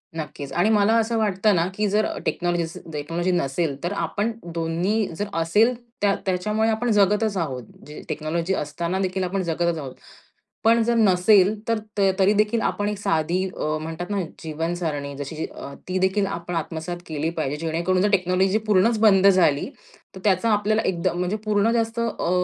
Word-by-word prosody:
नक्कीच, 150 Hz, -3 st, -6 dB
आणि 175 Hz, +5 st, +2 dB
मला 215 Hz, 0 st, +4 dB
असं 230 Hz, +1 st, +1 dB
वाटतं 210 Hz, -1 st, +2 dB
ना, 170 Hz, 0 st, +2 dB
की 210 Hz, +1 st, 0 dB
अ, -, -, +1 dB
जर 210 Hz, +2 st, +2 dB, 0.2 s
टेक्नॉलॉजी 175 Hz, -1 st, 0 dB
असेल 165 Hz, 0 st, -9 dB
टेक्नॉलॉजी 165 Hz, +5 st, -2 dB
नसेल 155 Hz, -2 st, 0 dB
तर 175 Hz, -, -1 dB
आपण 205 Hz, +2 st, -1 dB, 0.2 s
दोन्ही 175 Hz, +6 st, 0 dB
जर 205 Hz, +5 st, -3 dB
असेल 210 Hz, +9 st, +3 dB, 0.3 s
त्या 200 Hz, -1 st, +3 dB
त्याच्यामुळे 210 Hz, +4 st, 0 dB
आपण 225 Hz, +2 st, 0 dB
जगतच 210 Hz, 0 st, +2 dB
आहोत. 135 Hz, -7 st, -3 dB, 0.2 s
जी 150 Hz, -, -9 dB
टेक्नॉलॉजी 165 Hz, +4 st, -2 dB
असताना 170 Hz, +3 st, -2 dB
देखील 190 Hz, 0 st, -1 dB
आपण 190 Hz, +2 st, -1 dB
जगतच 170 Hz, 0 st, 0 dB
आहोत. 135 Hz, -4 st, -6 dB, 0.7 s
पण 230 Hz, +1 st, +5 dB
जर 235 Hz, -, +1 dB
नसेल 200 Hz, -1 st, +4 dB
तर 230 Hz, -1 st, +2 dB, 0.4 s
तरीदेखील 210 Hz, +3 st, +3 dB
आपण 205 Hz, -1 st, -1 dB
एक 210 Hz, -1 st, -3 dB
साधी 170 Hz, 0 st, 0 dB
अ, 155 Hz, 0 st, -1 dB
म्हणतात 165 Hz, +4 st, -6 dB
ना 200 Hz, -1 st, 0 dB, 0.2 s
जीवनसरणी 160 Hz, -2 st, -3 dB
जशी 155 Hz, +3 st, -4 dB, 0.4 s
ती 185 Hz, 0 st, 0 dB
देखील 190 Hz, +2 st, +1 dB
आपण 175 Hz, -2 st, -5 dB
आत्मसात 165 Hz, +2 st, -4 dB
केली 155 Hz, 0 st, -2 dB
पाहिजे. 155 Hz, -4 st, -2 dB
जेणेकरून 170 Hz, +3 st, 0 dB
जर 210 Hz, -, +3 dB
टेक्नॉलॉजी 190 Hz, +2 st, +2 dB
पूर्णच 215 Hz, +2 st, +3 dB
बंद 200 Hz, -3 st, +5 dB
झाली, 175 Hz, -7 st, +4 dB, 0.5 s
तर 190 Hz, -, -9 dB
त्याचा 200 Hz, +3 st, +2 dB
आपल्याला 215 Hz, +1 st, +2 dB
एकदम 175 Hz, -1 st, -1 dB
म्हणजे 180 Hz, +4 st, -1 dB
पूर्ण 215 Hz, +1 st, +2 dB
जास्त 230 Hz, 0 st, -1 dB
अ, 230 Hz, -6 st, -1 dB
185 Hz, 170 wpm, -23 LUFS, 165-210 Hz, 0.7 s, पण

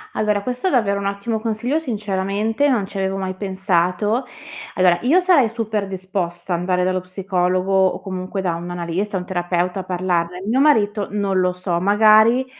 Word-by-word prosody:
Allora, 210 Hz, -1 st, 0 dB
questo 250 Hz, -, -2 dB
è -, -, +3 dB
davvero 200 Hz, -, +1 dB
un 200 Hz, -, -2 dB
ottimo 200 Hz, +3 st, -2 dB
consiglio, 230 Hz, +6 st, -1 dB
sinceramente 215 Hz, 0 st, -1 dB
non 230 Hz, -7 st, +1 dB
ci 195 Hz, 0 st, -6 dB
avevo 190 Hz, 0 st, -1 dB
mai 190 Hz, -1 st, -3 dB
pensato. 190 Hz, +4 st, 0 dB, 0.5 s
Allora, 180 Hz, -2 st, +3 dB
io 285 Hz, +9 st, +4 dB
sarei 340 Hz, -11 st, +4 dB
super 220 Hz, -3 st, -3 dB
disposta 185 Hz, -2 st, -3 dB
andare 180 Hz, +1 st, 0 dB
dallo 185 Hz, 0 st, 0 dB
psicologo 185 Hz, 0 st, -1 dB
o 190 Hz, -1 st, +3 dB
comunque 185 Hz, 0 st, -5 dB
da 180 Hz, -3 st, -1 dB
un 170 Hz, +1 st, -6 dB
analista, 175 Hz, +3 st, -3 dB
un 180 Hz, -, -5 dB
terapeuta 180 Hz, 0 st, -1 dB
a -, -, -4 dB
parlarne, 180 Hz, -1 st, -2 dB
mio 235 Hz, +5 st, +1 dB
marito 215 Hz, -8 st, +3 dB
non 200 Hz, -2 st, 0 dB
lo 180 Hz, 0 st, +2 dB
so, 180 Hz, -1 st, -2 dB
magari, 215 Hz, +5 st, +5 dB
195 Hz, 170 wpm, -20 LUFS, 180-215 Hz, 0.5 s, magari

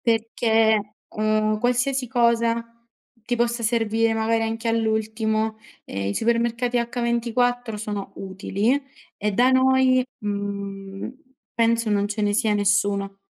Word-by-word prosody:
Perché, 225 Hz, -2 st, +1 dB, 0.2 s
uhm, 215 Hz, 0 st, +1 dB
qualsiasi 250 Hz, +2 st, +1 dB
cosa 235 Hz, -1 st, +2 dB, 0.6 s
ti 240 Hz, +2 st, -1 dB
possa 235 Hz, 0 st, 0 dB
servire 225 Hz, 0 st, +1 dB
magari 225 Hz, +1 st, +1 dB
anche 225 Hz, +1 st, -2 dB
all'ultimo, 220 Hz, -1 st, 0 dB, 0.3 s
ehm, 100 Hz, 0 st, -4 dB
i 100 Hz, -, -2 dB
supermercati 235 Hz, +1 st, +1 dB, 0.2 s
H24 235 Hz, -1 st, 0 dB
sono 205 Hz, -2 st, -5 dB
utili 200 Hz, +7 st, -1 dB, 0.4 s
e 210 Hz, +1 st, 0 dB
da 245 Hz, +5 st, +4 dB
noi, 260 Hz, 0 st, +4 dB, 0.2 s
mhmm, 200 Hz, 0 st, -5 dB, 0.4 s
penso 230 Hz, -1 st, +2 dB
non 205 Hz, 0 st, +1 dB
ce 210 Hz, +1 st, -3 dB
ne 205 Hz, 0 st, +2 dB
sia 215 Hz, 0 st, +2 dB
nessuno. 200 Hz, -1 st, +1 dB
225 Hz, 115 wpm, -23 LUFS, 210-235 Hz, 0.6 s, da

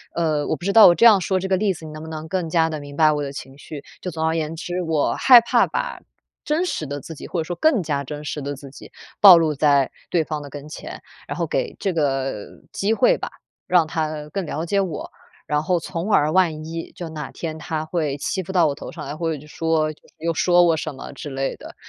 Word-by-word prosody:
呃， 155 Hz, -3 st, 0 dB
我 -, -, 0 dB
不 -, -, -14 dB
知 200 Hz, -, +1 dB
道 225 Hz, -1 st, +9 dB
我 175 Hz, -, +7 dB
这 230 Hz, -, +4 dB
样 210 Hz, -4 st, +7 dB
说 185 Hz, +1 st, 0 dB
这 190 Hz, -, -3 dB
个 190 Hz, -1 st, +2 dB
例 200 Hz, 0 st, +1 dB
子， 165 Hz, -2 st, -11 dB
你 -, -, -8 dB
能 155 Hz, 0 st, -8 dB
不 -, -, -8 dB
能 160 Hz, 0 st, -6 dB
更 180 Hz, 0 st, -2 dB
加 160 Hz, 0 st, +2 dB
地 155 Hz, -1 st, -4 dB
明 145 Hz, 0 st, -10 dB
白 155 Hz, -1 st, +5 dB
我 150 Hz, -1 st, -1 dB
的 140 Hz, -, -4 dB
情 135 Hz, 0 st, -9 dB
绪。 145 Hz, 0 st, -9 dB, 0.2 s
就 180 Hz, -, -4 dB
总 160 Hz, 0 st, -4 dB
而 160 Hz, -, 0 dB
言 160 Hz, 0 st, -2 dB
之， 175 Hz, +2 st, -4 dB
我 160 Hz, -3 st, +1 dB
害 250 Hz, -3 st, +8 dB
怕 235 Hz, -, +3 dB
把 -, -, -3 dB, 0.4 s
真 310 Hz, +4 st, 0 dB
实 165 Hz, -, -3 dB
的 145 Hz, +1 st, -4 dB
自 160 Hz, -, -9 dB
己， -, -, -9 dB
或 175 Hz, -, -3 dB
者 -, -, 0 dB
说 175 Hz, -, -4 dB
更 310 Hz, -9 st, +3 dB
加 145 Hz, -3 st, -2 dB
真 150 Hz, +2 st, -7 dB
实 150 Hz, -, -4 dB
的 140 Hz, +1 st, -3 dB
自 140 Hz, 0 st, -11 dB
己 -, -, -13 dB, 0.3 s
暴 190 Hz, -4 st, +11 dB
露 160 Hz, -2 st, +2 dB
在 140 Hz, -1 st, +3 dB, 0.2 s
对 170 Hz, -2 st, +2 dB
方 155 Hz, -1 st, -4 dB
的 145 Hz, -, -9 dB
跟 145 Hz, +1 st, -8 dB
前， -, -, -8 dB, 0.3 s
然 -, -, -4 dB
后 -, -, -1 dB
给 -, -, -2 dB
这 195 Hz, -, -1 dB
个 135 Hz, -8 st, -1 dB, 0.3 s
机 205 Hz, +3 st, 0 dB
会 -, -, +3 dB
吧， -, -, -5 dB, 0.4 s
让 175 Hz, -3 st, +4 dB
他 155 Hz, -1 st, -3 dB
更 195 Hz, +2 st, -3 dB
了 155 Hz, +1 st, -3 dB
解 200 Hz, +3 st, +1 dB
我， 175 Hz, -6 st, -4 dB, 0.4 s
然 150 Hz, 0 st, 0 dB
后 180 Hz, +2 st, +1 dB
从 170 Hz, +4 st, -4 dB
而 150 Hz, +1 st, +4 dB
万 160 Hz, -5 st, +2 dB
一 165 Hz, +1 st, -6 dB
就 175 Hz, -, -7 dB
哪 150 Hz, -4 st, -6 dB
天 160 Hz, -2 st, -5 dB
他 155 Hz, -1 st, -3 dB
会 155 Hz, -4 st, -2 dB
欺 190 Hz, +6 st, -2 dB
负 180 Hz, -, -7 dB
到 175 Hz, -4 st, +4 dB
我 140 Hz, -, -2 dB
头 -, -, -8 dB
上 -, -, -8 dB
来， 145 Hz, +2 st, -5 dB
或 165 Hz, +1 st, -2 dB
者 155 Hz, -, -3 dB
就 150 Hz, -, -14 dB
说 160 Hz, 0 st, 0 dB, 0.3 s
又 165 Hz, +1 st, -1 dB
说 175 Hz, +1 st, +4 dB
我 170 Hz, -2 st, +4 dB
什 155 Hz, 0 st, -4 dB
么 135 Hz, -, -9 dB
之 145 Hz, -, -7 dB
类 135 Hz, 0 st, -2 dB
的。 -, -, -12 dB
160 Hz, 280 characters per minute, -22 LUFS, 150-180 Hz, 0.4 s, 暴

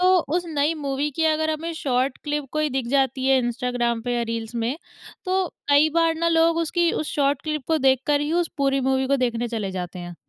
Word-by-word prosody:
तो 370 Hz, +1 st, +5 dB, 0.2 s
उस 355 Hz, -, -1 dB
नई 305 Hz, 0 st, 0 dB
मूवी 285 Hz, 0 st, -2 dB
की 325 Hz, -, +1 dB
अगर 315 Hz, 0 st, +2 dB
हमें 320 Hz, +2 st, -3 dB
शॉर्ट 255 Hz, -1 st, 0 dB
क्लिप 295 Hz, -1 st, -2 dB
कोई 305 Hz, 0 st, +1 dB
दिख 265 Hz, -2 st, -2 dB
जाती 265 Hz, -1 st, +1 dB
है 270 Hz, -1 st, +5 dB
इंस्टाग्राम 240 Hz, -1 st, -1 dB
पे 245 Hz, +1 st, -2 dB
या 240 Hz, -, 0 dB
रील्स 230 Hz, +1 st, -5 dB
में। 235 Hz, +5 st, -1 dB, 0.5 s
तो 375 Hz, 0 st, +1 dB, 0.2 s
कई 290 Hz, +2 st, +5 dB
बार 330 Hz, -1 st, +3 dB
ना 335 Hz, +1 st, 0 dB
लोग 330 Hz, 0 st, +3 dB
उसकी 345 Hz, +1 st, +1 dB
उस 310 Hz, -, -2 dB
शॉर्ट 280 Hz, -1 st, +1 dB
क्लिप 305 Hz, -3 st, -3 dB
को 320 Hz, -1 st, +2 dB
देखकर 270 Hz, +3 st, +2 dB
ही 295 Hz, +2 st, -2 dB
उस -, -, -8 dB
पूरी 275 Hz, -1 st, +1 dB
मूवी 265 Hz, 0 st, +1 dB
को 275 Hz, -, +2 dB
देखने 235 Hz, 0 st, -3 dB
चले 215 Hz, -4 st, -3 dB
जाते 180 Hz, -1 st, -5 dB
हैं। 175 Hz, 0 st, -7 dB
280 Hz, 220 wpm, -23 LUFS, 245-315 Hz, 0.5 s, तो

